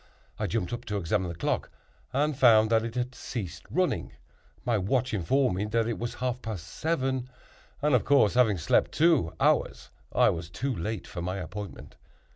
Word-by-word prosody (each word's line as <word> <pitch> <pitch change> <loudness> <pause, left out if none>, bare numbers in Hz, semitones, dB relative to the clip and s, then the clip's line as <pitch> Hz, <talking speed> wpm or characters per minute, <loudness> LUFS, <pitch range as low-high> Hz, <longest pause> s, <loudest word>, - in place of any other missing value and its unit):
I - - 0
jumped 90 - -2
up 120 - -4
to 105 -2 -2
examine 95 0 0
the 85 - -5
clock, - - -1 0.4
and 145 +3 +1
found 115 -4 +5
that 110 -1 +4
it 115 0 -5
had 125 0 -2
ceased 90 -11 -6
running. 185 0 0 0.5
My 120 - +2
watch 125 +6 0
informed 115 +3 +1
me 100 - -1
that 115 +1 0
it 115 - -2
was 120 0 -4
half 125 0 -2
past 105 -7 -5
seven; 130 - -1 0.5
and, 150 -1 +3
of 125 - +4
course, 140 -8 +4
having 115 -6 +4
slept 80 - +2
two 155 - +3
hours, - - +1 0.2
I - - +4
was 85 0 -5
too 130 +8 -2
late 105 +4 -4
for 90 - -6
my 90 +2 -3
appointment. 95 -1 -7
115 Hz, 185 wpm, -28 LUFS, 95-130 Hz, 0.5 s, found